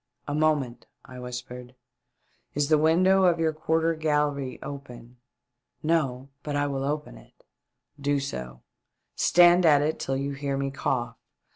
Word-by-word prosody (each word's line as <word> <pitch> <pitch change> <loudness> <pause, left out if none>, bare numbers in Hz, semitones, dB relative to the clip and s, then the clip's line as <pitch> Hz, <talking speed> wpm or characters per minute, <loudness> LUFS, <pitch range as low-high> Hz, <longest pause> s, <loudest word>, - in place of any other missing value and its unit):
" - - -55
A 145 - -2
moment," 150 -5 0 0.2
I 130 0 -11
whispered. 125 0 -8 0.8
Is 145 0 0
the 155 -1 +5
window 185 +5 +4
of 175 -2 +4
your 160 -1 +1
quarter 160 +1 +1
gallery 150 -4 -1
open 125 -3 -9 0.2
?" 125 0 -57
" - - -46
No; 135 -4 -1
but 145 -1 -4
I 145 0 +1
will 135 -1 -2
open 150 +1 -4
it." - - -22 0.3
" 145 - -26
Do 145 0 +1
so; 65 - -6 0.5
stand 175 +1 +5
at 145 -3 +5
it 155 +2 -1
till 135 0 -2
you 140 +1 -2
hear 140 0 -3
me 135 0 -2
cough. 130 -3 -2
145 Hz, 165 wpm, -26 LUFS, 130-155 Hz, 0.8 s, the